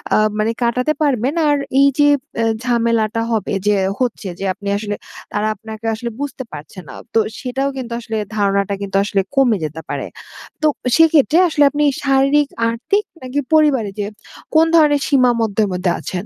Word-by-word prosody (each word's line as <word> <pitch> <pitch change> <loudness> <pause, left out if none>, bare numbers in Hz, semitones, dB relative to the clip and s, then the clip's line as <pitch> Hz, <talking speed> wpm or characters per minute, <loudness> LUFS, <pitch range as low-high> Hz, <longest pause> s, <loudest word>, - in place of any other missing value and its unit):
আ - - +4 0.2
মানে 215 +1 +1
কাটাতে 250 +5 +1
পারবেন। 270 -2 +1 0.2
আর 290 - +3 0.2
এই 280 - +6
যে 290 - +6 0.4
এ - - +2 0.2
ঝামেলাটা 230 -2 +1
হবে 220 -2 -1
যে 210 - +4 0.2
হচ্ছে, 235 -5 -2
যে 195 - -3
আপনি 200 +1 -10
আসলে 205 0 -3 0.4
তারা 210 +1 0
আপনাকে 220 +1 -10
আসলে 235 +1 -5
বুঝতে 275 -2 -4
পারছে 150 +4 -9
না। - - -10 0.2
তো 225 - +4 0.2
সেটাও 270 +2 -2
কিন্তু 245 -3 -6
আসলে 225 -1 -4 0.2
ধারণাটা 200 -1 +1
কিন্তু 195 -1 -5
আসলে 200 -1 0
কমে 250 -6 +4
যেতে 155 +1 -5
পারে। - - -3 0.5
তো 310 - +4 0.3
সেক্ষেত্রে 320 -1 +4
আসলে 295 -2 +3
আপনি 295 0 0 0.2
শারীরিক, 275 +1 +3 0.2
আর্থিক, 395 - 0 0.2
নাকি 255 +2 -3
পরিবারে 290 -9 +3
যে 205 - -1 0.5
কোন 320 - +6
ধরনের 295 -3 +4
সীমার 255 -4 +3
মধ্যে, 220 -1 +1
মধ্যে 180 0 0
আছেন? 185 +1 -5
235 Hz, 170 wpm, -18 LUFS, 210-280 Hz, 0.5 s, এই